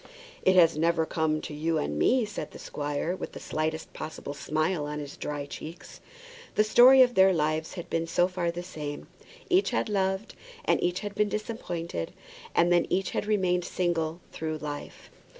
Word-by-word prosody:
"It 185 Hz, -, +4 dB
has 165 Hz, -3 st, +6 dB
never 165 Hz, 0 st, +2 dB
come 155 Hz, -1 st, 0 dB
to -, -, -7 dB
you 160 Hz, +2 st, 0 dB
and 75 Hz, +1 st, -2 dB
me," 250 Hz, -2 st, +3 dB
said 210 Hz, -1 st, -6 dB
the -, -, -11 dB
squire, 145 Hz, +4 st, -3 dB
with -, -, -7 dB
the -, -, -7 dB
slightest 160 Hz, +1 st, -3 dB
possible 155 Hz, -2 st, -6 dB
smile 155 Hz, +2 st, -1 dB
on 150 Hz, 0 st, -4 dB
his 145 Hz, -1 st, -6 dB
dry 145 Hz, -1 st, -4 dB
cheeks. 160 Hz, +4 st, -9 dB, 0.5 s
The 215 Hz, -, +5 dB
story 255 Hz, +4 st, +8 dB
of 245 Hz, -1 st, +1 dB
their 190 Hz, -2 st, +6 dB
lives 155 Hz, -1 st, 0 dB
had 175 Hz, -, -6 dB
been 165 Hz, 0 st, -1 dB
so 175 Hz, +2 st, +3 dB
far 180 Hz, -2 st, -2 dB
the 175 Hz, +1 st, -4 dB
same; 150 Hz, -5 st, -6 dB, 0.4 s
each 375 Hz, +2 st, +3 dB
had 235 Hz, -, -1 dB
loved, 190 Hz, +1 st, 0 dB, 0.3 s
and -, -, +2 dB
each 180 Hz, +1 st, 0 dB
had 205 Hz, -1 st, -5 dB
been 210 Hz, 0 st, +1 dB
disappointed, 175 Hz, -, -4 dB, 0.4 s
and 170 Hz, +1 st, +4 dB
then 175 Hz, -, +3 dB
each 190 Hz, +1 st, 0 dB
had -, -, -2 dB
remained 185 Hz, -4 st, +2 dB
single 170 Hz, -2 st, -1 dB
through 155 Hz, -1 st, -3 dB
life. 150 Hz, -1 st, -7 dB
170 Hz, 185 wpm, -28 LUFS, 155-190 Hz, 0.5 s, story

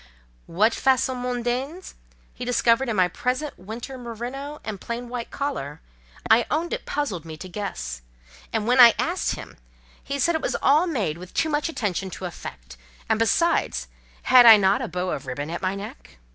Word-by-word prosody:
What 215 Hz, +7 st, +2 dB
"façons 260 Hz, -1 st, +1 dB
mondaines" 250 Hz, +7 st, -3 dB, 0.4 s
he 245 Hz, -, -7 dB
discovered 245 Hz, +1 st, +2 dB
in 225 Hz, -, -1 dB
my 185 Hz, -2 st, +4 dB
present 255 Hz, -, -3 dB
winter 235 Hz, +7 st, -7 dB
merino 250 Hz, +5 st, -6 dB
and 210 Hz, -3 st, -6 dB
plain 235 Hz, +1 st, -5 dB
white 240 Hz, -1 st, -5 dB
collar, 160 Hz, -, -4 dB, 0.5 s
I 225 Hz, +1 st, +4 dB
own 325 Hz, +3 st, -1 dB
it -, -, -5 dB
puzzled 235 Hz, -, -2 dB
me 160 Hz, -1 st, -9 dB
to 185 Hz, -, -8 dB
guess: 65 Hz, -, -5 dB, 0.5 s
and 220 Hz, -2 st, -1 dB
when 250 Hz, +3 st, +3 dB
I 235 Hz, -2 st, +9 dB
asked 350 Hz, +3 st, -1 dB
him, -, -, -10 dB, 0.5 s
he 280 Hz, -, -3 dB
said 335 Hz, +5 st, +2 dB
it 320 Hz, -, -1 dB
was -, -, -1 dB
all 305 Hz, +6 st, +4 dB
made 205 Hz, -, -2 dB
with 180 Hz, +1 st, -12 dB
too 320 Hz, -, +1 dB
much 295 Hz, +2 st, 0 dB
attention 195 Hz, -, -2 dB
to 190 Hz, -, -6 dB
effect—and 60 Hz, -, -6 dB
besides, 335 Hz, +9 st, +1 dB, 0.3 s
"had 250 Hz, -2 st, +7 dB
I 225 Hz, -2 st, +11 dB
not 195 Hz, 0 st, +2 dB
a -, -, -2 dB
bow 180 Hz, 0 st, -3 dB
of -, -, -5 dB
ribbon 145 Hz, +5 st, -4 dB
at 170 Hz, -, -4 dB
my 190 Hz, +1 st, -1 dB
neck?" 60 Hz, -, -10 dB
235 Hz, 180 wpm, -24 LUFS, 185-265 Hz, 0.5 s, I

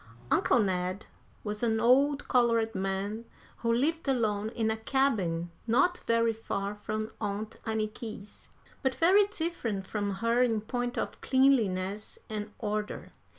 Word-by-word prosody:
Uncle -, -, +4 dB
Ned 185 Hz, -2 st, 0 dB, 0.4 s
was 210 Hz, 0 st, -3 dB
an 225 Hz, -2 st, +2 dB
old 275 Hz, +5 st, +3 dB
colored 230 Hz, -3 st, +3 dB
man 195 Hz, +4 st, -2 dB, 0.3 s
who 230 Hz, -, 0 dB
lived 295 Hz, +7 st, +1 dB
alone 220 Hz, -5 st, +1 dB
in 225 Hz, -1 st, 0 dB
a -, -, 0 dB
cabin 215 Hz, -10 st, 0 dB, 0.2 s
not 355 Hz, +10 st, +3 dB
very 230 Hz, 0 st, +3 dB
far 200 Hz, -2 st, -3 dB
from 215 Hz, +1 st, -4 dB
Aunt 210 Hz, +1 st, -3 dB
Anniky's, 215 Hz, -1 st, -5 dB, 0.3 s
but 265 Hz, -2 st, 0 dB
very 380 Hz, +8 st, +5 dB
different 320 Hz, -, -3 dB
from 205 Hz, -1 st, -2 dB
her 230 Hz, +4 st, +2 dB
in 225 Hz, -4 st, +2 dB
point 245 Hz, +2 st, -3 dB
of -, -, -3 dB
cleanliness 215 Hz, -7 st, +2 dB
and 210 Hz, 0 st, -4 dB
order. 210 Hz, -1 st, -3 dB
220 Hz, 135 wpm, -29 LUFS, 205-245 Hz, 0.4 s, very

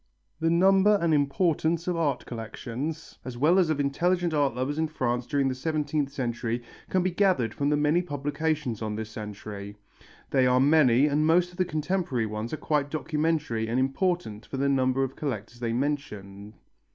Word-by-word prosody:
The 165 Hz, 0 st, +1 dB
number 195 Hz, +4 st, +5 dB
and 170 Hz, -3 st, +2 dB
importance 160 Hz, +3 st, +1 dB
of 180 Hz, -, 0 dB
art 160 Hz, -4 st, -1 dB
collections, 120 Hz, +7 st, -6 dB
as 125 Hz, -1 st, -7 dB
well 160 Hz, +8 st, +4 dB
as 175 Hz, -4 st, +3 dB
of 155 Hz, -2 st, 0 dB
intelligent 175 Hz, +4 st, +1 dB
art 145 Hz, -5 st, +1 dB
lovers 135 Hz, +4 st, -2 dB
in 160 Hz, -, +1 dB
France 125 Hz, -5 st, -2 dB
during 140 Hz, -2 st, +1 dB
the 130 Hz, -, 0 dB
seventeenth 150 Hz, 0 st, -1 dB
century, 120 Hz, -3 st, -3 dB, 0.3 s
can 185 Hz, -1 st, +1 dB
be 185 Hz, -, 0 dB
gathered 175 Hz, -, +2 dB
from 140 Hz, 0 st, 0 dB
the 150 Hz, -, +2 dB
many 150 Hz, +4 st, +3 dB
publications 145 Hz, -, -2 dB
on 110 Hz, -1 st, -3 dB
this 110 Hz, 0 st, -5 dB
century. 105 Hz, -1 st, -7 dB, 0.5 s
They 130 Hz, -2 st, +4 dB
are 125 Hz, 0 st, +4 dB
many, 140 Hz, -2 st, +5 dB
and 150 Hz, +1 st, +2 dB
most 175 Hz, +2 st, +3 dB
of 175 Hz, -, -16 dB
the 185 Hz, -, +2 dB
contemporary 155 Hz, -6 st, -1 dB
ones 110 Hz, +2 st, -4 dB
are 155 Hz, -, -3 dB
quite 145 Hz, -2 st, 0 dB
documentary 155 Hz, -7 st, -1 dB
and 120 Hz, +3 st, 0 dB
important 135 Hz, -, -1 dB
for 135 Hz, -, -5 dB
the 140 Hz, +1 st, +1 dB
number 135 Hz, -1 st, +2 dB
of 135 Hz, 0 st, -4 dB
collectors 120 Hz, -4 st, -5 dB
they 120 Hz, -1 st, -2 dB
mention. 105 Hz, -7 st, -4 dB
145 Hz, 180 wpm, -27 LUFS, 120-160 Hz, 0.5 s, number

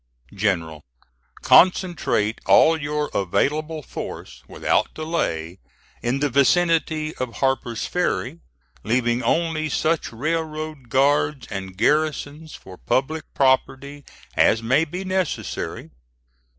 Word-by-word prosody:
"GENERAL: 85 Hz, -7 st, -1 dB, 0.6 s
Concentrate 175 Hz, -, +3 dB
all 165 Hz, -, +6 dB
your 150 Hz, -1 st, -3 dB
available 150 Hz, -, -1 dB
force -, -, -8 dB
without -, -, 0 dB
delay 95 Hz, -, -3 dB, 0.4 s
in 125 Hz, +4 st, -1 dB
the 145 Hz, -, +3 dB
vicinity 160 Hz, +2 st, +2 dB
of 125 Hz, -2 st, -4 dB
Harper's 130 Hz, -4 st, -1 dB
Ferry, 100 Hz, -, -2 dB, 0.4 s
leaving 120 Hz, +1 st, +1 dB
only 160 Hz, -2 st, 0 dB
such 160 Hz, +3 st, 0 dB
railroad 155 Hz, 0 st, -4 dB
guards 145 Hz, +2 st, +2 dB
and 95 Hz, -2 st, -6 dB
garrisons 150 Hz, +4 st, 0 dB
for 95 Hz, -1 st, -13 dB
public 155 Hz, +5 st, -1 dB
property 135 Hz, +1 st, +1 dB, 0.3 s
as 115 Hz, +1 st, +3 dB
may 130 Hz, +8 st, +3 dB
be 180 Hz, +5 st, -6 dB
necessary. 185 Hz, -3 st, -3 dB
145 Hz, 100 wpm, -22 LUFS, 120-155 Hz, 0.6 s, all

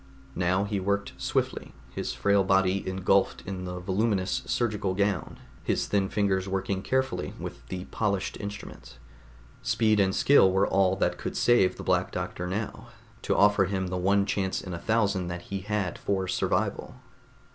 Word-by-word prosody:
Now 95 Hz, +2 st, +1 dB
he 100 Hz, -1 st, -2 dB
worked 100 Hz, +1 st, -1 dB
swiftly, -, -, -2 dB, 0.2 s
his -, -, -3 dB
frail 100 Hz, -1 st, +2 dB
body 95 Hz, 0 st, +2 dB
engulfed 95 Hz, +1 st, +1 dB
in 95 Hz, -1 st, -5 dB
the 90 Hz, 0 st, -5 dB
voluminous 95 Hz, +1 st, 0 dB
surgical 105 Hz, -5 st, 0 dB
gown, 100 Hz, -3 st, -1 dB, 0.3 s
his -, -, 0 dB
thin 100 Hz, -2 st, 0 dB
fingers 95 Hz, -2 st, 0 dB
working 95 Hz, 0 st, -1 dB
carefully 130 Hz, +5 st, -1 dB
with -, -, -8 dB
the 90 Hz, 0 st, -5 dB
polished 100 Hz, -3 st, -1 dB
instruments. 105 Hz, 0 st, -8 dB, 0.6 s
Speed 110 Hz, -2 st, +2 dB
and 95 Hz, -1 st, +2 dB
skill 135 Hz, -9 st, +5 dB
were 95 Hz, +1 st, +3 dB
all 95 Hz, -1 st, +2 dB
that -, -, 0 dB
could -, -, -4 dB
save 120 Hz, -7 st, +4 dB
the -, -, -8 dB
Black -, -, +1 dB
Doctor 90 Hz, -, -4 dB
now, 105 Hz, +4 st, -4 dB, 0.3 s
to -, -, 0 dB
offer 100 Hz, -1 st, +5 dB
him 95 Hz, -1 st, -2 dB
the 90 Hz, -, -2 dB
one 100 Hz, +2 st, +2 dB
chance 95 Hz, -1 st, -1 dB
in 90 Hz, -, -7 dB
a 85 Hz, -, -4 dB
thousand 100 Hz, -2 st, +1 dB
that 85 Hz, 0 st, -5 dB
he 100 Hz, -, -4 dB
had 100 Hz, -2 st, -2 dB
for 95 Hz, -2 st, -1 dB
survival. -, -, -1 dB
95 Hz, 165 wpm, -27 LUFS, 95-100 Hz, 0.6 s, skill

